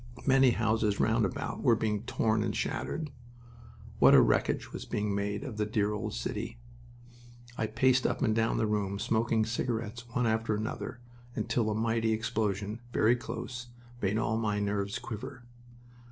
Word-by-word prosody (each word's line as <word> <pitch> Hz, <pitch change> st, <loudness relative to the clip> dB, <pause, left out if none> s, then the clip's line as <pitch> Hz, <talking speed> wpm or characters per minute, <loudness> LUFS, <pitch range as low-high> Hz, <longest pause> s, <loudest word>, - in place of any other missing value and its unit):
Many 135 Hz, -1 st, +6 dB
houses 110 Hz, -3 st, +1 dB
round 110 Hz, -1 st, +3 dB
about -, -, -5 dB
were 115 Hz, -, +5 dB
being 105 Hz, -2 st, -1 dB
torn 110 Hz, -2 st, +1 dB
and 110 Hz, -, -1 dB
shattered. 155 Hz, -3 st, -2 dB, 0.9 s
What -, -, +8 dB
a -, -, +9 dB
wreckage -, -, +2 dB
was -, -, -5 dB
being 105 Hz, -1 st, -2 dB
made 100 Hz, +3 st, -2 dB
of 130 Hz, -7 st, -6 dB
the 105 Hz, -, +1 dB
dear 105 Hz, -1 st, +1 dB
old 105 Hz, -, -3 dB
city! 110 Hz, -, -4 dB, 1.0 s
I 110 Hz, -, -1 dB
paced 130 Hz, +3 st, +3 dB
up -, -, -1 dB
and 110 Hz, -3 st, +2 dB
down 115 Hz, 0 st, +1 dB
the 110 Hz, -, +2 dB
room, 100 Hz, -2 st, -1 dB
smoking 110 Hz, +1 st, +1 dB
cigarettes, 115 Hz, 0 st, -3 dB
one 120 Hz, +1 st, 0 dB
after 110 Hz, -1 st, +1 dB
another, 110 Hz, +3 st, -4 dB, 0.3 s
until 115 Hz, -3 st, 0 dB
a 105 Hz, -, -1 dB
mighty 115 Hz, 0 st, +1 dB
explosion, 110 Hz, -1 st, -1 dB
very 115 Hz, +1 st, +4 dB
close, 125 Hz, 0 st, -6 dB, 0.3 s
made 100 Hz, +2 st, +1 dB
all 110 Hz, 0 st, 0 dB
my 105 Hz, -2 st, 0 dB
nerves 100 Hz, 0 st, -1 dB
quiver. 125 Hz, +4 st, -7 dB
110 Hz, 160 wpm, -30 LUFS, 105-115 Hz, 1.0 s, a